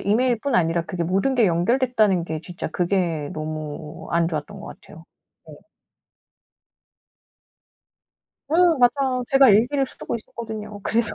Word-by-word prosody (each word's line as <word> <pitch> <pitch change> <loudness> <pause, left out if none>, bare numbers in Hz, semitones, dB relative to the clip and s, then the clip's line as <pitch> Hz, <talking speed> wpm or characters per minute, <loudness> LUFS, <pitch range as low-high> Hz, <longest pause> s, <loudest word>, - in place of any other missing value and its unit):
이메일뿐 240 +4 +1
아니라 165 -3 +2
그게 175 -1 -4
모든 195 +10 0
게 235 -4 +4
연결됐다는 210 +1 +2
게 160 -2 -5
진짜 175 +1 -6
그게 170 -5 -1
너무 155 0 -6
안 170 0 +2
좋았던 165 +5 -5
것 - - -9
같아요. 165 +1 -15 0.4
예. - - -11 3.0
음 335 -2 +4
맞아요. 255 0 +2
제가 270 -1 +6
일기를 250 +7 +3
쓰고 - - -6
있었거든요 215 -2 -8
그래서 230 +2 0
205 Hz, 280 characters per minute, -22 LUFS, 170-250 Hz, 3.0 s, 제가